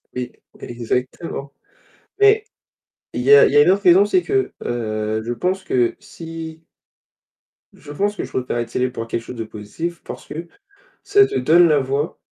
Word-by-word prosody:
Oui, 125 -1 -4 0.3
exactement, 125 +4 -4 0.7
mais 420 +1 +5 0.7
il - - -2
y 430 - +5
a 445 +2 +9
il - - 0
y - - +5
a - - +9
une - - +4
autre 200 +1 0
raison, 185 +3 +6
c'est 360 - +2
que, 395 +1 -1
heu, 110 -2 -2
je 120 - -3
pense 185 +10 -2
que 125 -9 +1
si 165 -1 -9 1.1
Je 145 - -13
pense 205 +7 -1
que - - -4
je - - -7
préfère 125 -1 -2
être 120 -1 -3
célèbre 125 +1 -1
pour 115 -2 -5
quelque 115 - -3
chose 125 - -9
de 115 - -4
positif 135 +12 -6
parce - - -9
que 165 +3 -7 0.6
ça 405 +1 +5
te - - -5
donne 165 +7 +5
la 150 -2 +4
voix, 140 +4 -2
150 Hz, 185 wpm, -20 LUFS, 120-190 Hz, 1.1 s, a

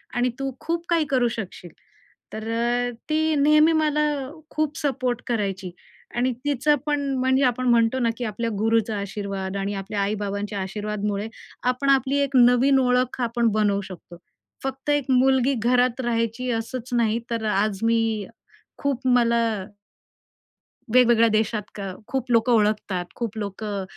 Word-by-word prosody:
आणि 245 +1 +2
तू 270 0 -2
खूप 335 0 -3
काही 335 -2 +2
करू 255 -3 +2
शकशील." 180 -4 -7 0.6
तर 220 +1 -5
अ, 240 +1 0 0.2
ती 315 0 +2
नेहमी 305 +2 +5
मला 300 -1 +2 0.5
खूप 310 0 -1
सपोर्ट 255 -5 -1
करायची 195 -5 -2 0.4
आणि 250 +2 +1
तिचं 290 +1 +2
पण 295 -1 0 0.2
म्हणजे 260 +1 +2
आपण 255 0 +1
म्हणतो 235 +1 +3
ना, 235 -2 +2
की 250 - -4
आपल्या 230 +2 -2
गुरूचा 225 0 +1
आशीर्वाद 200 -1 -4
आणि 200 +1 -2
आपल्या 200 +1 -3
आई-बाबांच्या 205 0 -2
आशीर्वादामुळे 210 +1 -3 0.4
आपण 275 +2 -2
आपली 275 0 +3
एक 280 -1 -3
नवीन 250 +3 +5
ओळख 250 0 +1
आपण 235 0 +1
बनवू 205 -1 +2
शकतो. 185 -2 -11 0.5
फक्त 270 +1 -4
एक 290 -2 +2
मुलगी 265 +1 +3
घरात 250 +1 +2
राहायची 230 +1 -1
असंच 230 +2 -4
नाही 230 -1 +2
तर 230 -1 -2
आज 200 -1 0
मी 225 -3 +1 0.5
खूप 270 -2 -1
मला 235 -2 +3 1.5
वेगवेगळ्या 240 -2 +5
देशात 215 0 +1
का 195 -2 -5
खूप 260 -2 -3
लोकं 235 +1 +3
ओळखतात, 210 -4 +1
खूप 230 -3 -4
लोकं 205 -1 -4
235 Hz, 145 wpm, -24 LUFS, 210-260 Hz, 1.5 s, नेहमी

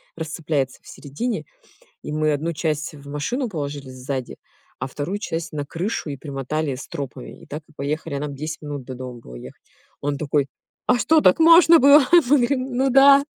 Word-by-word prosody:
расцепляется 155 -4 -3
в - - -19
середине. 215 - -4 0.6
И 150 - -6
мы 155 0 +1
одну 165 +4 -2
часть 155 0 -2
в 140 -1 -12
машину 235 - -2
положили 145 -5 -5
сзади, 130 0 -5 0.4
а - - -3
вторую 160 +10 -4
часть 165 -6 -4
на 145 - -2
крышу 165 +2 -3
и 140 - -5
примотали 140 +1 -3
стропами. 125 - -8
И - - -13
так 150 +2 -7
и - - -21
поехали. 145 +1 -3
А 140 - -2
нам 145 -1 -5
10 155 +3 -5
минут 145 -3 -5
до 130 - -7
дома 125 -1 -8
было 60 - -12
ехать. - - -11 0.4
Он 145 0 -1
такой: 145 -1 0 0.4
"А 250 - +4
что, 315 +5 +3
так 185 - +5
можно 330 0 +8
было?" 280 +2 +7
Мы 345 - +9 0.2
говорим: 255 0 0
"Ну 270 +1 +2
да". 275 +2 +7
150 Hz, 190 wpm, -22 LUFS, 140-230 Hz, 0.6 s, Мы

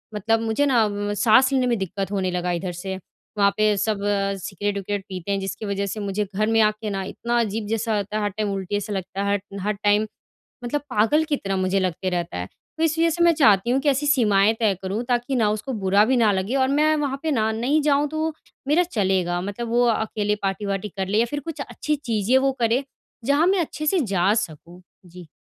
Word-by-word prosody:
मतलब 225 +2 +1
मुझे 225 +5 +1
ना 240 -6 +3
म 205 0 -3
साँस 245 +5 +4
लेने 260 -2 +2
में 240 -1 +1
दिक्कत 195 +1 -3
होने 190 -2 -1
लगा 180 0 -1
इधर 175 +1 -2
से। 190 +2 -5 0.4
वहाँ 200 0 +5
पे 215 -1 +3
सब 210 0 0 0.4
सिगरेट-विगरेट 200 +1 -3
पीते 185 +1 -5
हैं, 195 - 0
जिसकी 195 +3 -5
वजह 200 0 -2
से 205 +2 -4
मुझे 205 +1 -2
घर 215 +2 +1
में 225 0 +2
आके 215 0 +1
ना 195 -1 -2
इतना 235 +5 -2
अजीब 220 -1 -1
जैसा 225 +1 -1
रहता 205 +1 -2
है, 215 - -1
हर 205 - +1
टाइम 210 +1 -3
उल्टी 195 +1 -3
जैसा 205 +1 -3
लगता 190 0 -4
है, 200 - 0
हर 200 0 -5
हर, 210 - +2
टाइम 205 +1 +2 0.6
मतलब 290 +4 -1
पागल 235 +9 +3
की 305 -2 0
तरह 195 -1 -3
मुझे 185 +1 +1
लगते 185 0 -1
रहता 175 - -3
है। 90 - -4 0.3
तो 320 - 0
इस 320 0 +1
वजह 335 - +4
से 340 +1 0
मैं 340 0 +6
चाहती 220 - +4
हूँ 260 - +2
कि 290 - +2
ऐसी 280 +2 0
सीमाएँ 215 -7 +4
तय 215 -3 +3
करूँ, 195 +5 -3
ताकि 245 +2 0
ना 220 -4 +2
उसको 215 +5 -4
बुरा 200 -1 +3
भी 255 +2 +2
ना 220 -3 +4
लगे 195 +6 -1
और 260 -1 +3
मैं 300 +3 +3
वहाँ 280 -2 -2
पे 315 - 0
ना, 220 -4 +1
नहीं 250 +8 +1
जाऊँ, 290 0 +2
तो, 315 +1 -2 0.3
मेरा 310 +5 +4
चलेगा, 190 - 0
मतलब 205 +5 -5
वो 240 +1 +3
अकेले 215 -2 0
पार्टी 195 +1 -2
वार्टी 200 +1 -2
कर 190 -1 -1
ले 205 +3 +1
या 235 - +3
फिर 290 - -1
कुछ 315 +2 -6
अच्छी 305 - -2
चीज़ें 235 -3 +1
वो 270 +1 +2
करें, 235 +4 +2 0.4
जहाँ 285 +5 +3
मैं 385 0 +3
अच्छे 305 -1 -4
से 350 +4 +2
जा 195 - +2
सकूँ। 175 -3 -5 0.2
जी। 175 -1 -12
215 Hz, 230 wpm, -23 LUFS, 195-255 Hz, 0.6 s, मैं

